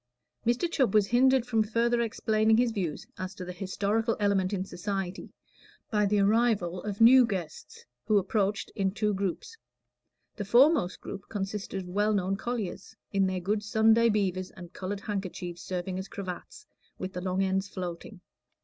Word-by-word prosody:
Mr. 240 +8 +2
Chubb 265 - +1
was 210 -2 +5
hindered 255 +3 +4
from 225 -3 +1
further 235 +2 +1
explaining 220 -1 +2
his 245 0 +3
views 185 -8 -3
as 185 0 -5
to 185 - -7
the 180 - -6
historical 205 +5 -1
element 200 -2 +2
in 190 -2 -2
society 195 0 -4 0.6
by 210 -2 +2
the 205 +1 +2
arrival 200 -4 +2
of 205 0 -5
new 255 +3 +9
guests, 180 - -5 0.2
who 215 - +4
approached 200 +1 0
in 195 -3 +1
two 210 +1 0
groups. 200 - -3 0.8
The 205 - -2
foremost 245 - +4
group 200 - -8
consisted 195 -1 -4
of - - -11
well 205 +3 +1
known 195 0 0
colliers, 210 -2 -5 0.2
in 195 -1 +3
their 185 -1 -1
good 205 +4 0
Sunday 220 +2 +4
beavers 185 -3 0
and 180 -1 -12
colored 195 +1 -4
handkerchiefs 185 -4 -5
serving 185 +2 -4
as 190 - -6
cravats, 195 - -7 0.3
with 185 +1 -5
the 180 - -4
long 185 +1 0
ends 190 +1 0
floating. 180 +2 -6
200 Hz, 165 wpm, -28 LUFS, 185-220 Hz, 0.8 s, new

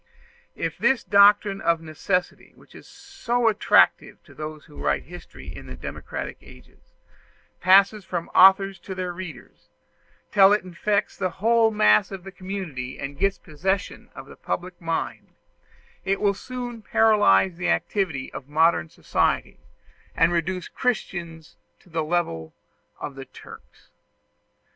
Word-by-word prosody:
If - - -4
this 265 -2 +2
doctrine 200 0 +4
of 170 -1 +2
necessity, 165 +3 -3
which - - -21
is - - -14
so 245 -13 -2
attractive 215 -2 +3
to - - -17
those 155 0 -8
who 150 - -15
write - - 0
history 80 - -11
in - - -10
democratic - - -6
ages, - - -19 0.6
passes 195 +3 +5
from 175 -2 -4
authors 195 0 +6
to 190 +2 -8
their 180 -1 -4
readers, 180 -1 -10 0.6
till 195 0 +6
it 210 - +1
infects 185 +3 -1
the 185 -2 -1
whole 225 +5 +2
mass 105 - +4
of 195 -2 -8
the 195 - -9
community 180 -10 -6
and 140 0 -7
gets 195 -1 +1
possession 190 +6 -3
of - - -9
the - - -13
public 180 0 -5
mind, 165 -1 -4 0.7
it 195 0 0
will 200 -1 +2
soon 245 +2 -7
paralyze 205 - +3
the 180 0 -2
activity 175 -6 -1
of 130 - -8
modern 160 - +2
society, - - -1 0.6
and 165 +2 +3
reduce 175 +2 -2
Christians 170 -9 -4 0.2
to 180 - -23
the 160 -1 -1
level 150 - -2 0.4
of 145 - -6
the 135 0 -9
Turks. - - -15
185 Hz, 140 wpm, -24 LUFS, 160-200 Hz, 0.7 s, authors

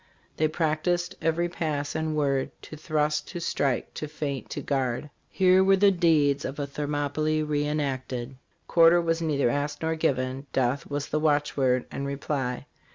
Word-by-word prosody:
' - - -35
' - - -38
They 155 - +3
practiced 170 +3 0
every 165 +2 +1
pass 150 -4 -3
and 160 -1 -2
word 140 -3 +1
To - - -9
thrust, 150 -1 -1
to 175 - -6
strike, 140 -6 -1
to 155 - -5
feint, 145 -4 -4
to - - -4
guard. 135 +1 -1 0.2
"Here 185 0 +4
were 195 0 +5
the 200 +1 +5
deeds 155 -6 +3
of 135 - -4
a 145 - -2
Thermopylae 150 +2 -1
re 150 -1 0
enacted. 135 -4 -3 0.3
Quarter 170 0 +6
was 165 -1 0
neither 140 -6 +1
asked 145 +2 -2
nor 160 0 +1
given 135 -3 -1
'death 130 +1 0
was 145 0 -3
the 155 - 0
watchword 145 -4 +1
and 140 - -4
reply. 140 -2 -3
150 Hz, 170 wpm, -27 LUFS, 140-160 Hz, 0.3 s, Quarter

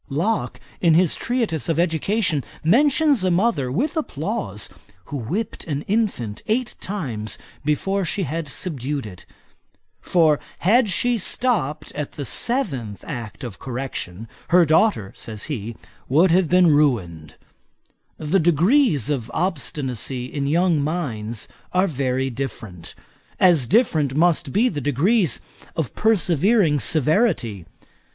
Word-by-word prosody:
Locke, 170 +11 -1 0.2
in 165 -3 +4
his 175 -1 +4
treatise 225 - -2
of 165 - +1
Education, 170 - +1 0.2
mentions 280 - +3
a 185 - +2
mother, 175 - +1
with 270 - -1
applause, 315 - -3 0.4
who 145 - -5
whipped 175 - -3
an 145 -2 -3
infant 195 - -1
eight 240 +2 0
times 125 - -4 0.3
before 195 +7 0
she 195 +3 -1
had 160 +1 -3
subdued 140 -2 -3
it; 95 -4 -11 0.7
for 160 -4 +3 0.2
had 220 +5 +3
she 240 +6 +1
stopped 185 - -1
at 150 -1 -5
the 145 - -5
seventh 135 - -1
act 115 -1 -6
of 120 -6 -7
correction, 120 -6 -5 0.2
her 175 0 +5
daughter, 155 - +2
says 110 -2 -7
he, 115 -6 -5 0.3
would 165 +7 +4
have 180 -2 +3
been 180 -2 +5
ruined. 95 - 0 0.8
The 160 +5 +1
degrees 170 - +3
of 120 -5 -2
obstinacy 135 - -2
in 140 +2 -3
young 165 0 +2
minds, 120 -9 -3 0.3
are 185 +1 +3
very 135 -5 -1
different; 110 -8 -7 0.4
as 170 -9 +4
different 155 - +2
must 155 -3 +2
be 225 - +3
the 150 -11 -3
degrees 155 - +2 0.4
of 155 -10 -2
persevering 190 -5 +2
severity. 140 - +1
155 Hz, 125 wpm, -22 LUFS, 130-190 Hz, 0.8 s, her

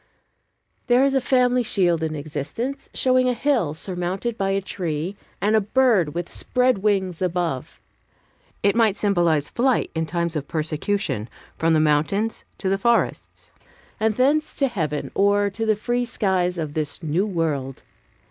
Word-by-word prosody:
There 250 +1 +5
is 275 - +2
a 270 - +2
family 250 -1 +3
shield 180 -7 +1
in 160 -1 -2
existence, 155 - -5
showing 255 -1 +2
a 250 - 0
hill 235 - +1
surmounted 185 +6 -3
by 195 -3 -1
a 195 0 +1
tree, 180 -2 -3 0.2
and 210 +2 +2
a 220 - +4
bird 205 - +2
with 175 0 -2
spread 250 -4 +1
wings 190 -4 0
above. 175 -7 -2 0.8
It 200 +1 +3
might 225 -3 +3
symbolize 170 -7 +2
flight 255 +1 +1
in 160 -1 -2
times 170 0 -2
of 145 -2 -3
persecution, 155 - -2 0.3
from 165 0 +1
the - - +4
mountains 155 +9 +1
to 195 - -4
the 195 +1 +1
forests, 235 +3 0 0.5
and 220 -1 +1
thence 290 +5 +2
to 275 - +2
heaven, 155 - -3
or 200 0 +2
to 225 +3 -3
the 215 - +4
free 240 +3 -1
skies 185 -6 0
of 155 -3 -3
this 155 +2 -3
New 165 +7 0
World. 150 -8 -2
195 Hz, 155 wpm, -23 LUFS, 160-230 Hz, 0.8 s, There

